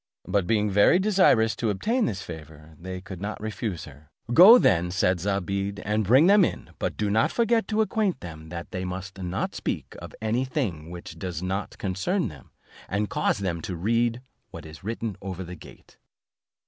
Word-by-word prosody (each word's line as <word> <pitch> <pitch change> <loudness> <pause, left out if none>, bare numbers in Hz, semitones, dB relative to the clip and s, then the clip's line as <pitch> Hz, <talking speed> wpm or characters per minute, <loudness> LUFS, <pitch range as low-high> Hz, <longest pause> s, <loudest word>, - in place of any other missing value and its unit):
But 95 -1 +1
being 105 -1 +2
very 105 - +5
desirous 185 - +3
to 115 - 0
obtain 225 - 0
this 100 -2 -3
favour, 80 -1 -11
they 90 +1 -6
could 95 -1 -9
not 105 +1 -4
refuse 110 -3 -4
her; 75 +1 -15 0.2
"Go 195 - +10
then," 90 - +3
said 95 -1 +1
Zobeide, 100 +1 -2
"and 105 +2 +1
bring 130 - +5
them 200 +1 +6
in, - - -3
but - - -2
do 105 -1 0
not 110 +2 +2
forget 230 -1 +2
to 220 0 +1
acquaint 215 - 0
them 80 -2 -9
that 85 0 -7
they 90 - -3
must 95 +1 -6
not 90 +1 -2
speak - - -4
of - - -10
any 110 +4 0
thing 105 - -3
which 85 0 -9
does 90 -3 -4
not 95 +2 -3
concern 105 - -1
them, 75 -5 -14 0.4
and 100 +2 -1
cause 150 - +1
them 90 -5 -2
to 90 - -5
read 115 +6 0 0.3
what - - -10
is 80 +2 -12
written 115 0 -4
over 95 -1 -5
the 90 0 -8
gate." - - -16
100 Hz, 185 wpm, -26 LUFS, 90-115 Hz, 0.4 s, Go